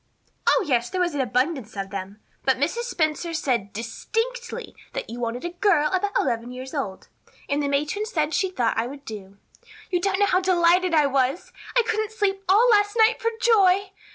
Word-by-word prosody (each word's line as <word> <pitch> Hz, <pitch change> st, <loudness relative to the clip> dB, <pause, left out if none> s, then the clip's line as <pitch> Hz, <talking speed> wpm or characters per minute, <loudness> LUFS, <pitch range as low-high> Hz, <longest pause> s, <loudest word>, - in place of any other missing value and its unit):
"Oh, -, -, +4 dB
yes, 240 Hz, -3 st, +1 dB
there 370 Hz, -, -3 dB
was 350 Hz, -2 st, +1 dB
an 285 Hz, -, 0 dB
abundance 255 Hz, -2 st, -1 dB
of 195 Hz, 0 st, -4 dB
them. 200 Hz, +1 st, -6 dB, 0.2 s
But 265 Hz, -1 st, +2 dB
Mrs. 340 Hz, -, -1 dB
Spencer 330 Hz, -5 st, -1 dB
said 240 Hz, -10 st, -1 dB
distinctly 455 Hz, -, -4 dB, 0.2 s
that -, -, -5 dB
you 240 Hz, -, -6 dB
wanted 240 Hz, +4 st, -3 dB
a 345 Hz, -, -3 dB
girl 350 Hz, -4 st, +2 dB
about 400 Hz, +2 st, 0 dB
eleven 235 Hz, -2 st, -1 dB
years 255 Hz, +1 st, -8 dB
old. 205 Hz, -11 st, -4 dB, 0.4 s
And 285 Hz, 0 st, 0 dB
the 285 Hz, -, 0 dB
matron 295 Hz, +9 st, -1 dB
said 310 Hz, -7 st, -1 dB
she 380 Hz, -, +1 dB
thought 240 Hz, -11 st, 0 dB
I 230 Hz, -, 0 dB
would 280 Hz, +2 st, -10 dB
do. 200 Hz, -2 st, -9 dB, 0.5 s
You 355 Hz, -1 st, +1 dB
don't 390 Hz, 0 st, +1 dB
know 405 Hz, -, +4 dB
how 370 Hz, -1 st, +2 dB
delighted 360 Hz, -1 st, +3 dB
I 300 Hz, -2 st, +5 dB
was. 270 Hz, +3 st, 0 dB, 0.2 s
I 485 Hz, -, +5 dB
couldn't 435 Hz, -1 st, -1 dB
sleep 390 Hz, -2 st, -1 dB
all 430 Hz, +6 st, +6 dB
last 410 Hz, 0 st, +3 dB
night 445 Hz, +1 st, +4 dB
for 460 Hz, -, +2 dB
joy. 395 Hz, -4 st, +4 dB
320 Hz, 195 wpm, -24 LUFS, 250-395 Hz, 0.5 s, all